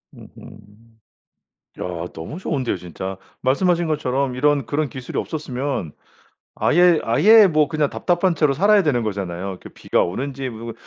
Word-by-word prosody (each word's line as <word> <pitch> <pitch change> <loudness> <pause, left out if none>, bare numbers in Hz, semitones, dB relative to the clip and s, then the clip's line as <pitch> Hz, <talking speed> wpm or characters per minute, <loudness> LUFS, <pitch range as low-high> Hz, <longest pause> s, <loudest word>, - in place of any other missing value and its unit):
으흠. 105 +2 -16 0.8
야. 85 -2 -4
너무 80 - -7
좋은데요 135 - -2
진짜. 90 +2 -7 0.2
말씀하신 170 +6 +1
것처럼 140 -4 -1
이런 145 0 +2
그런 145 +2 -1
기술이 130 -1 -7
없었으면 135 - -4 0.6
아예 175 -1 +4
아예 210 - +6
뭐 155 -4 +2
그냥 155 -3 0
답답한 175 0 +1
채로 150 -3 +2
살아야 205 +5 +4
되는 140 -8 +1
거잖아요. 95 -3 -4
그 - - -11
비가 - - 0
오는지 135 +8 -3
뭐 115 0 -7
135 Hz, 315 characters per minute, -21 LUFS, 110-155 Hz, 0.8 s, 아예